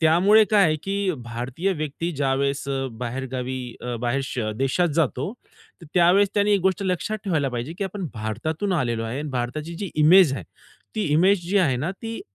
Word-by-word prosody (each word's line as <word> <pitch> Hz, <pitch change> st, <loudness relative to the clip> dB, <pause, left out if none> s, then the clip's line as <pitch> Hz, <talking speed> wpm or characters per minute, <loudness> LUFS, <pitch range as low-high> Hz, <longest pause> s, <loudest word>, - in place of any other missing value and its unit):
त्यामुळे 185 Hz, +7 st, +5 dB
काय 205 Hz, -2 st, +5 dB
आहे 155 Hz, -2 st, +2 dB
की 195 Hz, -1 st, 0 dB
भारतीय 125 Hz, +11 st, -2 dB
व्यक्ती 155 Hz, +3 st, -3 dB
ज्यावेळेस 140 Hz, 0 st, -1 dB
अ, 135 Hz, -1 st, -1 dB
बाहेरगावी 130 Hz, +2 st, -4 dB, 0.2 s
अ, 125 Hz, -1 st, -3 dB
बाहेर 120 Hz, +3 st, 0 dB
श 125 Hz, -, -4 dB, 0.2 s
देशात 135 Hz, +8 st, +1 dB
जातो, 150 Hz, -, 0 dB, 0.5 s
तर 165 Hz, -, -11 dB
त्यावेळेस 180 Hz, +3 st, +5 dB
त्याने 205 Hz, 0 st, +3 dB
एक 200 Hz, -, +3 dB
गोष्ट 190 Hz, +2 st, +1 dB
लक्षात 190 Hz, +4 st, -1 dB
ठेवायला 155 Hz, -8 st, +1 dB
पाहिजे 120 Hz, +5 st, -4 dB
की 200 Hz, -, -1 dB
आपण 195 Hz, -1 st, -4 dB
भारतातून 125 Hz, -, -2 dB
आलेलो 120 Hz, -7 st, 0 dB
आहे 115 Hz, +4 st, -4 dB
आणि 150 Hz, -, -4 dB
भारताची 135 Hz, +6 st, -3 dB
जी 195 Hz, 0 st, -5 dB
इमेज 155 Hz, +1 st, +6 dB
आहे 110 Hz, -10 st, -6 dB, 0.5 s
ती 215 Hz, -, +1 dB
इमेज 175 Hz, +2 st, +3 dB
जी 200 Hz, -, +4 dB
आहे 145 Hz, -9 st, +2 dB
ना 150 Hz, +8 st, -2 dB
ती 225 Hz, 0 st, -5 dB
155 Hz, 185 wpm, -24 LUFS, 130-190 Hz, 0.5 s, इमेज